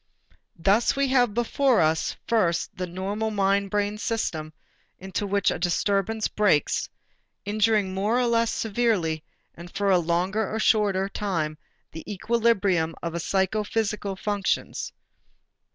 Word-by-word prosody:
Thus 200 Hz, +10 st, +3 dB
we 275 Hz, -1 st, +1 dB
have 245 Hz, -5 st, +3 dB
before 240 Hz, +1 st, +2 dB
us, 160 Hz, 0 st, +1 dB
first 175 Hz, -8 st, +1 dB
the 180 Hz, 0 st, -4 dB
normal 195 Hz, +5 st, -3 dB
mind 200 Hz, -1 st, +1 dB
brain 205 Hz, +1 st, -1 dB
system 160 Hz, -10 st, -2 dB, 0.5 s
into 190 Hz, +2 st, -4 dB
which 200 Hz, 0 st, +2 dB
a -, -, -3 dB
disturbance 200 Hz, +5 st, 0 dB
breaks, 200 Hz, -9 st, +1 dB, 0.6 s
injuring 210 Hz, -2 st, +1 dB
more 205 Hz, +5 st, +1 dB
or 250 Hz, -, +2 dB
less 230 Hz, -1 st, +2 dB
severely 200 Hz, -9 st, 0 dB, 0.3 s
and 170 Hz, +1 st, -11 dB
for 200 Hz, +2 st, 0 dB
a 185 Hz, -, +5 dB
longer 180 Hz, +5 st, 0 dB
or 220 Hz, -, -2 dB
shorter 205 Hz, -4 st, +2 dB
time 175 Hz, -7 st, -2 dB, 0.4 s
the 160 Hz, -, -8 dB
equilibrium 200 Hz, -6 st, +1 dB
of 170 Hz, -1 st, -3 dB
the 170 Hz, -, -2 dB
psychophysical 205 Hz, +2 st, -1 dB
functions. 200 Hz, 0 st, -2 dB
200 Hz, 130 wpm, -25 LUFS, 180-220 Hz, 0.6 s, a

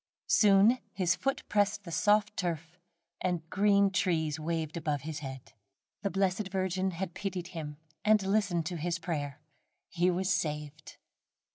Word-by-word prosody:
Soon 215 Hz, -, +5 dB
his 180 Hz, -3 st, +2 dB
foot 270 Hz, +1 st, -1 dB
pressed 205 Hz, 0 st, +1 dB
the 170 Hz, -, -8 dB
soft 210 Hz, +4 st, +3 dB
turf, 170 Hz, -2 st, -3 dB, 0.4 s
and 175 Hz, -3 st, -1 dB
green 200 Hz, 0 st, +4 dB
trees 160 Hz, -5 st, 0 dB
waved 160 Hz, 0 st, -2 dB
above 150 Hz, -4 st, -1 dB
his 155 Hz, +1 st, -5 dB
head. 135 Hz, -3 st, -8 dB, 0.5 s
The 200 Hz, -, 0 dB
blessed 195 Hz, +1 st, 0 dB
Virgin 190 Hz, 0 st, 0 dB
had 180 Hz, 0 st, -4 dB
pitied 185 Hz, -3 st, -4 dB
him 150 Hz, -3 st, -6 dB, 0.3 s
and 215 Hz, -1 st, +4 dB
listened 190 Hz, -4 st, +1 dB
to 175 Hz, +1 st, -3 dB
his 170 Hz, +2 st, -1 dB
prayer. 145 Hz, -5 st, -4 dB, 0.5 s
He 175 Hz, +1 st, +2 dB
was 185 Hz, +2 st, +1 dB
saved. 150 Hz, -3 st, -4 dB
180 Hz, 145 wpm, -31 LUFS, 160-195 Hz, 0.5 s, Soon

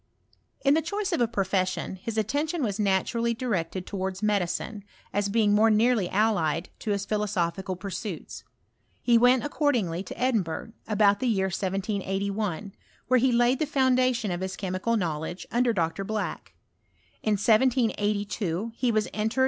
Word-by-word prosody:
iln 275 Hz, -, +6 dB
the 320 Hz, -, +3 dB
choice 400 Hz, +4 st, -2 dB
of 335 Hz, -, 0 dB
a 240 Hz, -, +4 dB
profession, 190 Hz, -4 st, -1 dB
his 220 Hz, +4 st, -5 dB
attention 290 Hz, -, 0 dB
was 210 Hz, -2 st, -2 dB
naturally 220 Hz, +4 st, +1 dB
directed 190 Hz, -6 st, -2 dB
towards 190 Hz, 0 st, -4 dB
medicine, 205 Hz, +1 st, -1 dB, 0.3 s
as 205 Hz, 0 st, 0 dB
being 210 Hz, -1 st, +3 dB
more 215 Hz, +2 st, +5 dB
neaxly 220 Hz, -3 st, +3 dB
allied 185 Hz, -6 st, +1 dB
to 220 Hz, -, -5 dB
his 200 Hz, -1 st, 0 dB
philosophical 190 Hz, -3 st, -1 dB
pursuits. 190 Hz, -1 st, -6 dB, 0.6 s
He 240 Hz, -, +4 dB
went 250 Hz, +1 st, +5 dB
accordingly 240 Hz, -, 0 dB
to 190 Hz, -, -8 dB
Edinburgh, 225 Hz, -5 st, 0 dB, 0.2 s
about 205 Hz, -1 st, +3 dB
the 255 Hz, -, 0 dB
year 190 Hz, -4 st, +1 dB
178(L, 195 Hz, 0 st, -2 dB, 0.4 s
where. 255 Hz, 0 st, +5 dB
he 260 Hz, +1 st, +3 dB
laid 240 Hz, +2 st, +3 dB
the 310 Hz, -, 0 dB
foundation 255 Hz, -5 st, +2 dB
of 175 Hz, 0 st, -3 dB
his 190 Hz, 0 st, -3 dB
chemical 190 Hz, +4 st, -1 dB
know 165 Hz, -7 st, -1 dB
ledge 175 Hz, +4 st, -6 dB
under 240 Hz, 0 st, +2 dB
Dr. 175 Hz, -1 st, -1 dB
Black. 215 Hz, +1 st, -4 dB, 0.7 s
In 215 Hz, -, +1 dB
1782 215 Hz, -3 st, +1 dB
he 250 Hz, -1 st, +1 dB
was 215 Hz, -1 st, +1 dB
entered. 220 Hz, +4 st, -1 dB
210 Hz, 150 wpm, -27 LUFS, 190-235 Hz, 0.7 s, iln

